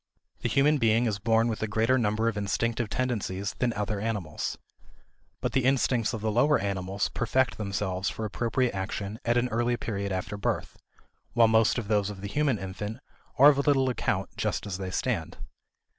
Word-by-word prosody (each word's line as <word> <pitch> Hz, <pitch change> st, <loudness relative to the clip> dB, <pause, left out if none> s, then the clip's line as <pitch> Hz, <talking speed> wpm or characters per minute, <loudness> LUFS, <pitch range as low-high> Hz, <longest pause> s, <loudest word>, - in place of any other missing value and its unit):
The -, -, -1 dB
human 145 Hz, +2 st, +3 dB
being 115 Hz, 0 st, +3 dB
is 105 Hz, -4 st, -1 dB
born 115 Hz, +2 st, +3 dB
with 110 Hz, -2 st, -3 dB
a 110 Hz, -, 0 dB
greater 110 Hz, +4 st, +2 dB
number 110 Hz, -2 st, +1 dB
of 115 Hz, -, 0 dB
instinctive 110 Hz, +3 st, -1 dB
tendencies 105 Hz, -6 st, -2 dB
than 125 Hz, -1 st, +2 dB
other 105 Hz, 0 st, -2 dB
animals. 105 Hz, -8 st, -3 dB, 0.8 s
But 125 Hz, -1 st, -1 dB
the 130 Hz, +1 st, +1 dB
instincts 125 Hz, -3 st, +2 dB
of 115 Hz, -3 st, -5 dB
the 110 Hz, 0 st, 0 dB
lower 140 Hz, +7 st, +4 dB
animals 95 Hz, 0 st, -2 dB
perfect 130 Hz, +1 st, +1 dB
themselves 100 Hz, -2 st, -2 dB
for 110 Hz, -, -5 dB
appropriate 120 Hz, +3 st, 0 dB
action 100 Hz, +2 st, -4 dB
at 120 Hz, +1 st, +2 dB
an 120 Hz, +1 st, +2 dB
early 120 Hz, +1 st, 0 dB
period 100 Hz, -4 st, -3 dB
after 95 Hz, +2 st, -3 dB
birth, 100 Hz, -, -2 dB, 0.6 s
while 115 Hz, -1 st, +6 dB
most 110 Hz, +1 st, +3 dB
of 115 Hz, -4 st, -3 dB
those 105 Hz, -2 st, +1 dB
of 100 Hz, -2 st, -8 dB
the 100 Hz, -, -4 dB
human 140 Hz, +2 st, +1 dB
infant 100 Hz, +3 st, -5 dB, 0.4 s
are 140 Hz, +3 st, +9 dB
of 140 Hz, -1 st, +1 dB
little 135 Hz, -2 st, +4 dB
account -, -, -2 dB
just -, -, -1 dB
as 95 Hz, -2 st, -4 dB
they 95 Hz, -1 st, -4 dB
stand. -, -, -2 dB
110 Hz, 185 wpm, -28 LUFS, 100-120 Hz, 0.8 s, are